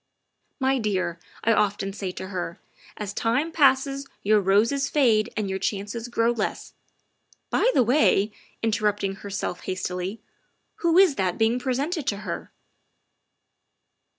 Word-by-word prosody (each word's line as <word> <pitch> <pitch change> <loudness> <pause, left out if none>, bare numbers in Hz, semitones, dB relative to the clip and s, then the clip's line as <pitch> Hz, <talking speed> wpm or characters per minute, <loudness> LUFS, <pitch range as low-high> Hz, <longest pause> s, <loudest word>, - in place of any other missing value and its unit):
' - - -53
' - - -49
' - - -49
My 265 0 +3
dear, 185 -6 -1
' - - -23
I 230 - +4
often 205 -2 0
say 195 -2 -4
to 190 - -7
her, 175 -3 -4 0.2
' - - -24
as 205 -2 -4
time 250 +10 0
passes 275 -2 +3 0.2
your 210 +1 +4
roses 225 +9 +2
fade 230 -7 +3
and 215 -2 0
your 190 0 -2
chances 205 +4 -3
grow 235 -1 +2
less' 225 -3 -3 0.8
By - - +3
the 255 - +5
way" 230 -5 +3 0.3
interrupting 210 -3 0
her 200 - -8
self 195 -2 -4
hastily 185 +2 -3 0.3
" - - -48
who 340 0 +2
is 370 -7 +6
that 185 -2 0
being 225 +2 +2
presented 280 +5 -2
to 200 - 0
her?" - - -5
215 Hz, 160 wpm, -25 LUFS, 195-265 Hz, 0.8 s, is